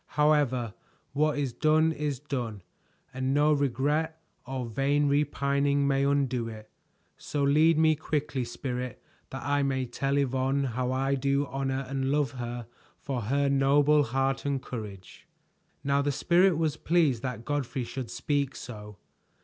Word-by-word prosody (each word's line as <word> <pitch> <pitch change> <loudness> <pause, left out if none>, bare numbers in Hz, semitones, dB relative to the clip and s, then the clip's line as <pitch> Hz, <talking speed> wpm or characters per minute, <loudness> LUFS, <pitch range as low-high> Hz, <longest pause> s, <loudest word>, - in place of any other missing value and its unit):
However, 140 -7 +2 0.4
what 150 +1 +1
is 140 -4 -1
done 155 +3 +3
is 150 -3 -2
done, 120 - -4 0.5
and 130 +1 -1
no 150 +1 +4
regret 145 +4 0 0.3
or 130 -1 -3
vain 140 +5 +1
repining 140 0 +1
may 135 0 +2
undo 135 -4 +1
it. 110 -1 -10 0.5
So 145 +1 -3
lead 155 +3 +4
me 160 0 +4
quickly, 150 -3 -2
Spirit, 125 +1 -5 0.3
that - - -6
I 145 0 +1
may 135 -2 0
tell 135 +3 -1
Yvonne 135 0 +1
how 125 +1 -1
I 135 +1 0
do 140 +1 +1
honor 135 0 -2
and 135 0 -2
love 145 -1 +1
her 120 -2 -5 0.3
for 130 -3 -3
her 140 +6 +1
noble 140 +2 +4
heart 135 +1 0
and 140 -1 0
courage." 105 -7 -9 0.6
Now 140 0 +2
the 145 0 0
Spirit 175 +5 +3
was 160 -2 0
pleased 155 -8 +2
that 125 -3 -5
Godfrey 135 -3 -2
should 125 0 -6
speak 140 +1 -1
so. 105 -3 -9
140 Hz, 150 wpm, -28 LUFS, 130-145 Hz, 0.6 s, no